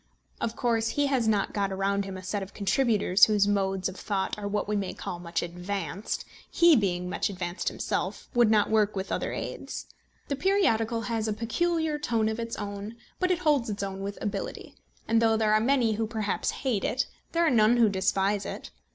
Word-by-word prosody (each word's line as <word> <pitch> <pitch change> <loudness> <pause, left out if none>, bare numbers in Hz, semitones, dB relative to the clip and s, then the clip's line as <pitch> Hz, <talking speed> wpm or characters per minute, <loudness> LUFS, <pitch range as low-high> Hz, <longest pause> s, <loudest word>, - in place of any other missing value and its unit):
Of 230 - -2
course 230 -1 +1
he 285 +5 +1
has 265 -5 +1
got 200 -1 +1
around 195 +1 0
him 190 -1 -6
a 185 - -9
set 200 +3 -2
of 195 0 -8
contributors 205 -2 +4
whose 205 -2 +2
modes 195 -2 +1
of 185 - -6
thought 195 -1 -2
are 205 -1 -5
what 205 0 -1
we 210 - 0
may 200 -2 -2
call 175 - -5
much 170 -1 -2
advanced; 190 +4 -4 0.2
he 340 -2 +6
being 180 -6 0
"much 180 - -1
advanced" 180 -2 -4
himself, - - -2
would 240 -3 +4
not 215 -1 +3
work 215 -1 +3
with 190 0 -4
other - - -1
aids. - - -5 0.4
The 280 - -1
periodical 265 - +2
has 225 -1 -2
a 215 - 0
peculiar 315 +7 0
tone 225 -6 +1
of 220 +1 -3
its 230 0 -3
own; 205 +1 -6 0.2
but 365 - +1
it 365 - +3
holds 295 -9 +2
its 205 -1 -3
own 195 0 -4
with 200 +1 -4
ability, 205 - -4 0.3
and 230 0 +3
though 225 -1 +4
there 215 -1 +2
are 215 - +5
many 240 -2 +3
who 220 +1 -1
perhaps 215 -3 -1 0.2
hate 225 -7 +1
it, 260 - 0 0.3
there 335 0 +3
are 320 - +3
none 230 0 +5
who 235 -2 +6
despise 195 +1 +1
it. - - -7
215 Hz, 205 wpm, -28 LUFS, 195-235 Hz, 0.4 s, he